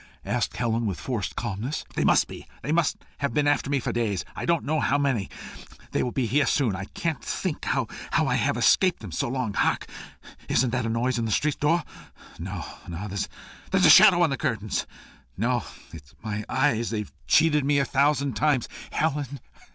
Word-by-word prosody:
asked - - -1
Helen, 115 -1 0
with 95 -4 -3
forced 115 -7 -3
calmness. 115 +5 -3
"They - - 0
must - - +4
be. - - -10 0.2
They 145 - -2
must 165 -1 +2 0.2
have 140 0 -1
been 150 -1 +2
after 145 -1 +1
me 140 -1 +2
for - - -2
days 105 -6 -1
I - - -4
don't 170 -2 +2
know 155 +2 +1
how 145 - +2
many. 135 -8 0 0.6
They - - 0
will 125 - -1
be 130 -1 0
here 140 +6 +2
soon. 120 -9 +2
I 95 +1 -5
can't 160 - -3
think - - -3
how - - +1 0.3
I - - +2
have - - +1
escaped 185 -7 +3
them 100 -5 -8
so 80 - -1
long. 125 -5 -2
Hark! - - +1 0.6
Isn't 125 -2 +2
that 120 -1 -1
a - - -1
noise 120 +2 0
at 115 - -1
the - - -2
street 145 +8 +1
door? 165 +3 +2 0.6
No, 90 -3 -5 0.2
no. 85 +4 -5
There's 100 +1 -2
a - - +8
shadow 175 -1 +8
on 160 - +2
the 135 - -1
curtains! 110 -4 -2 0.5
No! 120 +2 0 0.3
it's 75 -3 -12
my 105 -1 -3
eyes; 130 -4 +1
they've 105 -2 -4 0.2
cheated 150 -3 +4
me 145 +1 +2
a 140 - +2
thousand 140 0 +2
times. 140 +1 +1 0.2
Helen! 145 -3 -1
125 Hz, 195 wpm, -26 LUFS, 110-145 Hz, 0.6 s, a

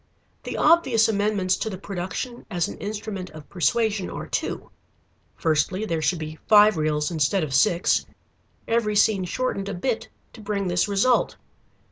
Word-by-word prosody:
The - - -5
obvious 270 -9 +4
amendments 205 -3 +1
to 220 - -3
the 190 - -6
production 195 +6 -5
as 175 -5 -1
an - - -8
instrument 205 -2 -5
of 155 -1 -12
persuasion 200 - 0
are - - -6
two. - - -4 0.6
Firstly 165 +6 0
there 165 -6 -2
should 175 +3 +1
be 155 0 -7
five 210 -1 +7
reels 155 +1 0
instead 165 +3 +1
of 145 -3 -4
six, 175 +4 +2 0.6
every 225 -2 +1
scene 205 -2 +3
shortened 200 0 -2
a 200 - -4
bit 225 +5 -2 0.3
to 225 - -12
bring 200 -2 -2
this 175 +3 +1
result. 205 +5 +2
200 Hz, 155 wpm, -24 LUFS, 175-220 Hz, 0.6 s, five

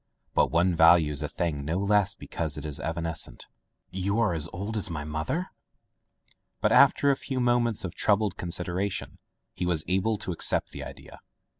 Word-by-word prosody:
But - - +3
one 85 +2 +2
values 80 -3 +5
a - - -1
thing 75 -5 -3
no 80 +5 -2
less 100 0 +2
because 80 -3 -4
it 75 - -6
is 75 0 -4
evanescent. 80 -6 -3 0.5
"You 100 +2 0
as 80 -3 0
old 100 +5 -5
as 105 -3 0
my 75 -3 -4
mother!'* 80 - -3 1.1
But - - +1
after 140 - +5
a - - +2
few 135 -1 -4
moments 120 -4 +1
of 90 - -5
troubled 105 -2 +1
consideration 90 +2 -3 0.3
he 90 - -3
Was 85 -3 +1
able 95 +5 +1
to 95 - -4
accept 85 - +1
the - - -7
idea. - - -11
90 Hz, 165 wpm, -27 LUFS, 80-105 Hz, 1.1 s, values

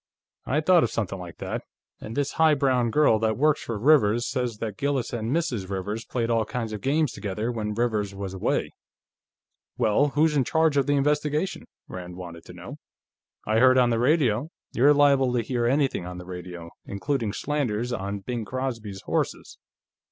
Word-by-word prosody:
"I 145 +5 +1
thought 175 +1 +5
of 115 - +1
something 95 -4 -3
like 90 -2 -9
that. - - -4 0.4
And 110 +4 -7
this 145 -1 0
high 160 -1 +4
brown 130 -4 +2
girl 145 -4 +4
that 110 -1 0
works 150 +2 +2
for 115 - -4
Rivers 120 -2 +4
says 125 -3 -2
that 105 -2 -4
Gillis 140 -1 -1
and 115 -1 -2
Mrs. 130 - -1
Rivers 100 +4 -4
played 120 -2 -2
all 115 -1 +2
kinds 115 0 -4
of 105 - -5
games 145 0 +1
together, 105 +3 -3
when 105 -3 -3
Rivers 105 -4 -1
was 95 -1 -5
away." 95 - -1 1.1
"Well, 110 +7 +3
who's 150 +2 +2
in 140 - +3
charge 160 +2 +2
of 140 -1 +2
the 145 - +3
investigation?" 150 +4 0 0.2
Rand 90 -1 -8
wanted 85 -2 -9
to - - -11
know. - - -9 0.7
"I 110 +1 +2
heard, 130 +1 +6
on 125 -1 +4
the 115 - +1
radio 130 -1 +2
..." - - -66
"You're 140 +5 +5
liable 140 -3 +4
to 120 -2 +1
hear 120 0 -1
anything 135 -8 +1
on 90 0 -7
the 90 - -9
radio, 90 -2 -8
including 110 +2 -2
slanders 125 -3 -2
on 100 -2 -4
Bing 120 +3 -4
Crosby's 115 -5 -4
horses. - - -3
120 Hz, 185 wpm, -25 LUFS, 105-140 Hz, 1.1 s, heard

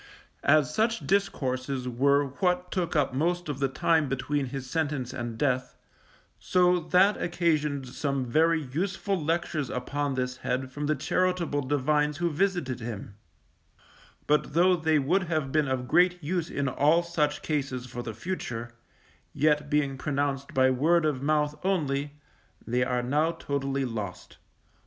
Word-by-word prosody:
As 150 0 +4
such 225 +3 0
discourses 135 -9 -1
were 140 +4 +3
what 180 +5 -1
took 175 -2 -1
up 145 -4 +2
most 175 +5 0
of 140 -2 -3
the 135 - +2
time 155 +2 +1
between 135 +1 -1
his 135 0 -6
sentence 145 -4 -2
and 120 -2 -5
death, 130 -2 0 0.6
so 180 -1 +3
that 185 +5 +3
occasioned 155 -6 0
some 140 +1 -2
very 160 +6 +3
useful 185 +8 -2
lectures 160 -4 -1
upon 140 +3 -2
this 125 0 -2
head 130 +1 -2
from 145 +2 -4
the 155 - +2
charitable 175 0 0
divines 145 +2 +1
who 170 0 0
visited 165 -7 0
him; 110 -3 -6 1.1
but 150 0 +1
though 180 +2 +5
they 160 -2 +2
would 175 +7 +1
have 155 -5 -1
been 155 -1 +2
of 130 -1 -2
great 180 +2 +3
use 170 +2 -1
in 140 -1 -2
all 150 +6 +3
such 155 -4 -1
cases 135 -5 -2
for 125 -1 -6
the 115 -3 -6
future, 120 - -5 0.6
yet 150 0 +2
being 140 -3 0
pronounced 140 -1 -2
by 130 0 +4
word 155 +6 +3
of 145 -4 0
mouth 150 +1 0
only, 145 -7 0 0.5
they 125 +2 +1
are 125 -1 -1
now 150 +6 +2
totally 135 -2 -2
lost. 110 -6 -6
145 Hz, 150 wpm, -27 LUFS, 130-165 Hz, 1.1 s, though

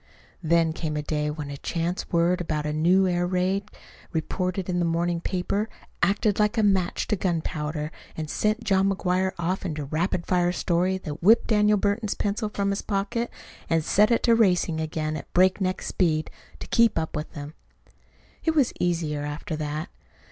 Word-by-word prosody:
Then 165 -1 +2
came 155 -2 -3
a 150 - -2
day 150 0 -1
when 150 -1 -5
a 140 - -6
chance 170 +5 -3
word 175 +2 +2
about 155 -3 -2
a 150 - -1
new 180 +5 +4
air 175 -1 +1
raid 190 +3 0 0.4
reported 185 +3 -2
in 180 -1 0
the - - +2
morning 170 0 0
paper 200 +4 -1 0.3
acted 205 +3 +2
like 210 +2 +2
a 220 - +3
match 190 -3 +2
to 210 - +2
gunpowder, 155 -4 -2 0.3
and 155 -1 -3
sent 215 +8 0
John 195 -2 +3
McGuire 190 -1 0
off 175 +2 -1
into 155 -5 -3
a - - -6
rapid 170 +4 -1
fire 175 -1 +2
story 180 +1 +1
that 155 -4 -7
whipped 220 +6 +6
Daniel 210 -1 +3
Burton's 205 +2 0
pencil 210 +1 -1
from 200 -1 -1
his 200 - -2
pocket 215 +4 -1 0.4
and 165 -1 +2
set 210 +2 +4
it 235 - +2
to 235 - +5
racing 180 -7 +2
again 155 0 -2
at - - -8
breakneck 185 +1 +2
speed 155 -4 0 0.3
to - - -8
keep 230 -1 +3
up 160 -1 -2
with 150 +1 -4
him. 145 +1 -7 0.9
It 320 -1 +1
was 280 -6 +3
easier 165 -4 0
after 150 +4 -4
that. 155 +3 -3
180 Hz, 180 wpm, -25 LUFS, 160-200 Hz, 0.9 s, whipped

